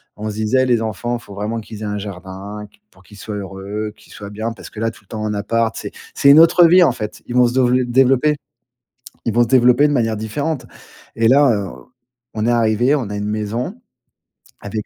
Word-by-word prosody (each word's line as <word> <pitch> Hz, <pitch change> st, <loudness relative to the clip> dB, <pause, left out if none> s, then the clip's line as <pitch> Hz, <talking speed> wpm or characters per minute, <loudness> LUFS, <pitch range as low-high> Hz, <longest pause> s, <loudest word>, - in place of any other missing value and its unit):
on 110 Hz, +1 st, -5 dB
se 105 Hz, -, -6 dB
disait: 120 Hz, +5 st, +1 dB
«Les 120 Hz, -3 st, +2 dB
enfants, 120 Hz, +2 st, -3 dB
faut 100 Hz, -3 st, -13 dB
vraiment 105 Hz, +3 st, -3 dB
qu'ils 105 Hz, 0 st, -10 dB
aient -, -, -4 dB
un 105 Hz, 0 st, -3 dB
jardin, 100 Hz, +1 st, -8 dB
q -, -, -28 dB
pour 95 Hz, -, -22 dB
qu'ils 105 Hz, +3 st, -16 dB
soient 105 Hz, +2 st, -7 dB
heureux, 100 Hz, +2 st, -5 dB
qu'ils -, -, -20 dB
soient 100 Hz, -1 st, -9 dB
bien», 110 Hz, +2 st, -4 dB
parce -, -, -12 dB
que -, -, -10 dB
là 115 Hz, 0 st, 0 dB
tout 110 Hz, -1 st, -19 dB
le -, -, -33 dB
temps 110 Hz, -1 st, -5 dB
en 105 Hz, 0 st, -2 dB
appart 110 Hz, +2 st, -1 dB
c'est -, -, -6 dB, 0.2 s
c'est 140 Hz, -, +4 dB
une 145 Hz, +3 st, +9 dB
autre 170 Hz, +1 st, +6 dB
vie 180 Hz, +1 st, +6 dB
en 145 Hz, -, +4 dB
fait. 105 Hz, -3 st, -6 dB
Ils 120 Hz, -, -5 dB
vont 125 Hz, -1 st, +5 dB
se 120 Hz, -, -3 dB
dovelé 125 Hz, -1 st, +2 dB
développer 135 Hz, +4 st, +3 dB, 0.9 s
ils 115 Hz, -, 0 dB
vont 120 Hz, -, +4 dB
se 120 Hz, -, 0 dB
développer 125 Hz, +3 st, +5 dB
de 145 Hz, -, 0 dB
manière 115 Hz, -4 st, 0 dB
différente. 130 Hz, +6 st, -3 dB, 0.5 s
Et 115 Hz, 0 st, +2 dB
là 140 Hz, +1 st, +5 dB
heu, 100 Hz, -3 st, -2 dB, 0.7 s
on 110 Hz, +1 st, -1 dB
est -, -, +2 dB
arrivé, 120 Hz, +3 st, +2 dB
on 125 Hz, -9 st, -2 dB
a 105 Hz, -, -4 dB
une 105 Hz, 0 st, -3 dB
maison 115 Hz, -, -3 dB, 0.8 s
avec. 105 Hz, +1 st, -5 dB
115 Hz, 230 wpm, -19 LUFS, 105-125 Hz, 0.9 s, une